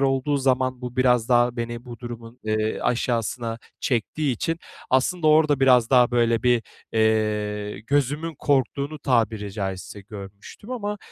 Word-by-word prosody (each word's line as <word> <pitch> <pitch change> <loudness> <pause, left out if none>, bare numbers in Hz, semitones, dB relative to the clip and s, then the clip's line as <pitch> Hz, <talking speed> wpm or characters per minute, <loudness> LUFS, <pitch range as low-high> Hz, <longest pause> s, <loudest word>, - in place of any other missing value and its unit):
olduğu 135 +1 +1
zaman, 130 -1 +1
bu 125 0 -7
biraz 125 -3 +3
daha 120 0 +3
beni 120 +1 -4
bu 120 -1 -9
durumun, 120 0 -9
eee, 110 0 -1
aşağısına 115 -1 -1 0.2
çektiği 135 +4 0
için, 165 +8 -2 0.3
aslında 155 +6 +2
orada 155 -2 +4
biraz 125 -3 +5
daha 125 -2 +5
böyle 115 -2 +2
bir, 120 -2 +3 0.3
eee, 105 -2 0
gözümün 145 +6 -1
korktuğunu, 140 +2 0
tabiri 115 -6 0
caizse, 95 0 -5
görmüştüm 100 - -10
ama, 210 -4 -3
120 Hz, 135 wpm, -24 LUFS, 110-135 Hz, 0.3 s, biraz